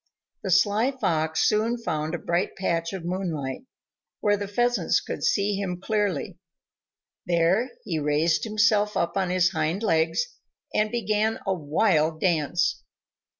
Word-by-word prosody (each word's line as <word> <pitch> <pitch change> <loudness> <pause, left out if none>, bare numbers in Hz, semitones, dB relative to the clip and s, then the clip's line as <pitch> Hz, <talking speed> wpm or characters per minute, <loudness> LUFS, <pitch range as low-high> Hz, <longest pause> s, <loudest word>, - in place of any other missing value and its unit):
The 195 - -4
sly 205 +6 +3
Fox 160 - 0
soon 225 +3 +1
found 155 -7 -2
a - - -2
bright 170 +2 -1
patch 170 -3 -1
of 185 -3 -6
moonlight, 175 - -3 0.5
where 205 -1 +2
the 200 0 -4
Pheasants 240 -3 +1
could - - -6
see 205 +1 +2
him 185 -3 -3
clearly; 205 -5 -1 0.9
there 175 +8 +2
he 165 -4 -2
raised 150 +3 +1
himself 210 -1 +2
up 170 0 0
on 190 -2 0
his 180 0 +3
hind 165 +4 -1
legs, 165 - +2 0.5
and 215 0 +2
began 215 -1 0
a 195 - +1
wild 155 -1 +1
dance. 175 0 +1
185 Hz, 140 wpm, -25 LUFS, 165-210 Hz, 0.9 s, sly